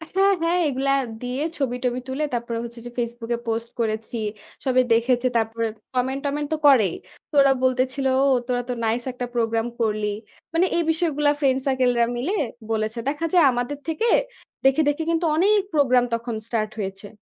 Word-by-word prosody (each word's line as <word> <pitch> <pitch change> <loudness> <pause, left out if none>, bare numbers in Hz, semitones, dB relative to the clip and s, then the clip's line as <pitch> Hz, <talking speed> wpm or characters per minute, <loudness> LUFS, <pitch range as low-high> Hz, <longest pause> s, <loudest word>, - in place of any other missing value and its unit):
হ্যাঁ, 390 +1 +5
হ্যাঁ, 335 +2 +2
এগুলা 275 0 0 0.3
দিয়ে 250 +3 -3 0.2
ছবি-টবি 250 -2 -1
তুলে 270 +4 -2
তারপরে 235 -1 -2
হচ্ছে 235 0 -8
যে - - -5
ফেসবুকে 235 0 -2
পোস্ট 230 +1 -2
করেছি, 220 +1 -2 0.5
সবাই 255 -1 +4
দেখেছে, 240 +2 +2
তারপরে 225 0 -1 0.3
কমেন্ট-টমেন্ট 275 +3 -1
তো - - 0
করেই। 220 -11 +5 0.3
তো - - -65
ওরা 275 -1 +5
বলতেছিল 260 +1 +1 0.4
"তোরা 245 -1 0
তো - - 0
নাইস 230 +2 0
একটা 250 0 -4
প্রোগ্রাম 225 0 +1
করলি।" 215 -1 0 0.5
মানে 335 +3 +3
এই 340 - +2
বিষয়গুলা 305 -3 +1
ফ্রেন্ড 265 -3 +2
সার্কেলরা 250 -3 +3
মিলে 295 +12 -1 0.4
বলেছে। 220 +1 -1
দেখা 300 +3 -2
যায় 350 - +6
আমাদের 245 +4 -2
থেকে 330 +9 0 0.6
দেখে, 270 +4 +5
দেখে 290 +2 -1
কিন্তু 335 +1 +1
অনেক 405 +6 +4
প্রোগ্রাম 255 -5 +4
তখন 230 0 -2
স্টার্ট 215 -2 -1
হয়েছে। 195 0 -5
250 Hz, 160 wpm, -23 LUFS, 230-285 Hz, 0.6 s, যায়